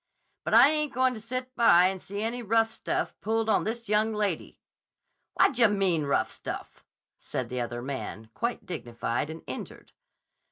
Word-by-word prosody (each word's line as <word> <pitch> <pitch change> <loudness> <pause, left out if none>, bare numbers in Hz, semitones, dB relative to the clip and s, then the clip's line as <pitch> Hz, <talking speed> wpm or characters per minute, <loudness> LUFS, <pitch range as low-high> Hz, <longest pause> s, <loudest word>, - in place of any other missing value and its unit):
'But - - +2
I 245 +5 +9
ain't 300 -1 0
goin' 255 0 +2
to 220 - -8
sit 255 +3 -5
by 185 -7 +6
and 190 0 0
see 200 +2 -5
any 235 +2 -2
rough 225 0 +2
stuff - - -2
pulled 225 +1 0
on - - +2
this 230 +1 -3
young 215 +1 +2
lady.' 205 -6 -2 0.8
'Whad - - +4
dye 235 -2 +5
mean, 190 -7 +1
rough 110 -5 +1
stuff?' - - -7 0.4
said - - -4
the 125 0 -2
other 120 0 -4
man, 125 -4 -6
quite 235 +1 -3
dignified 120 -3 -3
and 160 +1 -8
injured. - - -8
215 Hz, 170 wpm, -28 LUFS, 160-235 Hz, 0.8 s, I